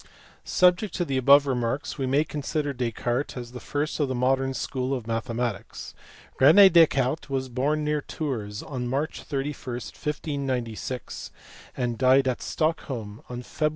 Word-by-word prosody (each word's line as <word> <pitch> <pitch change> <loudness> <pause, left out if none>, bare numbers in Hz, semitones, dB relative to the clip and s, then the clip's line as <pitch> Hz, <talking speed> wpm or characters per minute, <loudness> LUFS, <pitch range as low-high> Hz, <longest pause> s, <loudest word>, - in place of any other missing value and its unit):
Subject 180 +3 +3
to 175 - 0
the 135 -4 -1
above 140 +2 +6
remarks 130 +2 -2
we 135 - 0
may 140 +3 +3
con 150 -1 -5
sider 145 0 -2
Descartes 120 +2 -2
as 120 -1 -7
the 125 - -8
first 145 +4 -3
of 145 - +2
the 130 - -2
modern 135 +1 +1
school 130 0 -2
of 125 - -5
mathe 115 +1 -2
matics. 115 -3 -4 0.5
Rene 175 +9 +8
Descartes 155 -5 +3
was 130 -1 -2
born 145 +5 0
near 150 0 0
Tours 110 -10 -4
on 130 -5 -4
March 140 +5 -2
31, 135 -3 -4
1596, 130 -3 -4 0.5
and 120 -2 -2
died 130 +1 +5
at 125 - -1
Stockholm 130 -10 -2
on 125 0 -6
Feb. 155 +4 0
135 Hz, 155 wpm, -26 LUFS, 125-150 Hz, 0.5 s, Rene